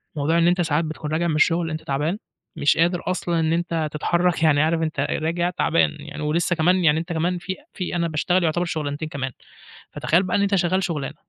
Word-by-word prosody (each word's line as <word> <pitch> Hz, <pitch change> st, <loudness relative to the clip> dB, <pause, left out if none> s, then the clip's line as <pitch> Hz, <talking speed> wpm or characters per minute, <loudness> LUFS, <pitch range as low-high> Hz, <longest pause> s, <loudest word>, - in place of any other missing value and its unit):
موضوع 155 Hz, +3 st, +1 dB
إن 170 Hz, -, +4 dB
أنت 175 Hz, +1 st, +3 dB
ساعات 160 Hz, -1 st, +1 dB
بتكُون 155 Hz, -1 st, -5 dB
راجع 165 Hz, +2 st, 0 dB
من 160 Hz, -, 0 dB
الشغل 165 Hz, +2 st, +2 dB
أنت 155 Hz, 0 st, -4 dB
تعبان، 150 Hz, +5 st, -1 dB, 0.4 s
مش 145 Hz, -, +2 dB
قادر 175 Hz, +2 st, +2 dB
أصلًا 175 Hz, -2 st, -1 dB
إن 160 Hz, 0 st, +1 dB
أنت 165 Hz, -2 st, -1 dB
تتحرك، 170 Hz, +3 st, 0 dB
يعني 145 Hz, -2 st, +4 dB
عارف 160 Hz, +1 st, +1 dB
أنت 160 Hz, -1 st, -2 dB
راجع 170 Hz, +2 st, 0 dB
تعبان 85 Hz, -, +1 dB
يعني، -, -, -8 dB
ولسّه 170 Hz, +3 st, +1 dB
كمان 180 Hz, +3 st, +2 dB
يعني 155 Hz, -1 st, +4 dB
أنت 170 Hz, +1 st, -4 dB
كمان 175 Hz, +3 st, 0 dB
في 190 Hz, +2 st, -5 dB, 0.2 s
في 180 Hz, -2 st, -4 dB
أنا 170 Hz, -1 st, 0 dB
باشتغل 175 Hz, +3 st, +1 dB
يُعتبر 170 Hz, +2 st, +1 dB
شُغلانتين 155 Hz, -2 st, -3 dB
كمان. 135 Hz, -4 st, -4 dB, 0.6 s
فتخيل 170 Hz, +4 st, +1 dB
بقى 185 Hz, -, -1 dB
إن -, -, +1 dB
أنت 200 Hz, 0 st, +2 dB
شغال 185 Hz, +1 st, +1 dB
شُغلانة 150 Hz, -7 st, -3 dB
165 Hz, 215 wpm, -23 LUFS, 155-175 Hz, 0.6 s, إن